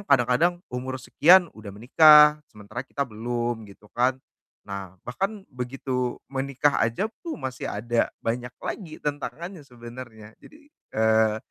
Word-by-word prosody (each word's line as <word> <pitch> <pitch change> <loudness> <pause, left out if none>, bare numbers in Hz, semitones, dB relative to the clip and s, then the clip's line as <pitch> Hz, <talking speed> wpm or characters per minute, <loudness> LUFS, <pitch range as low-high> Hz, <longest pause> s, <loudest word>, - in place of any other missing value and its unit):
kadang-kadang 140 +7 +2
umur 130 +1 -4
sekian 170 +7 +4
udah 110 -1 -11
menikah 150 +8 +6
sementara 105 +3 -8
kita 140 +1 -3
belum, 120 -1 -4
gitu 100 +1 -17
kan. 125 +2 +1 0.5
Nah, 100 -2 -7
bahkan 195 - -3
begitu 125 0 -3 0.2
menikah 140 +1 0
aja 115 - 0 0.2
pun 330 -3 -5
masih 130 -1 -5
ada 115 +3 0 0.2
banyak 120 +2 -2 0.2
lagi 165 -7 -5
tantangannya 160 +5 -5
sebenernya, 120 -3 -11
jadi, 300 - -16 0.4
eee, 110 0 +3
125 Hz, 125 wpm, -25 LUFS, 115-150 Hz, 0.5 s, menikah